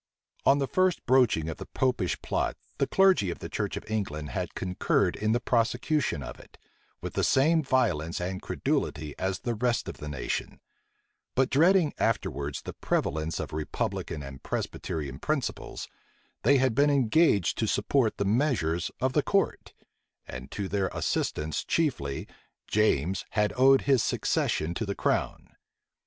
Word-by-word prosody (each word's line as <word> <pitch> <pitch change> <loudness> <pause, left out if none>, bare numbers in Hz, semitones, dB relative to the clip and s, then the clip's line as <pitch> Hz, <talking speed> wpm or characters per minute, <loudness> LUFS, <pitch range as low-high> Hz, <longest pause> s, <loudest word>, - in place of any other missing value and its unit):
On 140 - +6
the 140 - +1
first 185 +5 +1
broaching 120 -11 +3
of 80 - -4
the - - -8
Popish 125 -8 0
plot, - - -1 0.2
the - - +2
clergy 190 - +4
of 85 - -4
the - - -7
church - - -2
of - - -7
England 75 -9 -3
had - - -4
concurred 90 0 +1
in 110 +1 0
the 120 - +2
prosecution 125 - 0
of - - -8
it, - - -17 0.4
with - - -5
the - - 0
same 160 +5 +4
violence 115 - 0
and 95 +1 -3
credulity 75 -1 -2
as 95 0 -1
the 120 - -1
rest 120 +1 0
of - - -6
the 75 - -7
nation: 70 -3 -3 0.8
but 130 0 +2
dreading 170 +2 +4
afterwards 70 -10 -1
the - - -6
prevalence 80 +2 -1
of - - -5
republican 75 -1 -3
and 70 -1 -9
Presbyterian 70 -4 -4
principles, - - -3 0.5
they 140 +4 +5
had 130 -2 +2
been 145 +4 +4
engaged 135 - +3
to - - +1
support 130 -6 +1
the 100 - 0
measures 100 - +1
of 130 0 +1
the 150 - +3
court; 195 +7 0 0.6
and 65 +2 -8
to 100 -2 -4
their 95 -1 0
assistance 75 0 -1
chiefly, 120 - -1 0.4
James 95 -4 +1
had 105 0 +2
owed 135 +1 +6
his 135 -4 +3
succession 80 +2 0
to 110 - -3
the 100 - -2
crown. - - -1
110 Hz, 155 wpm, -28 LUFS, -, 0.8 s, On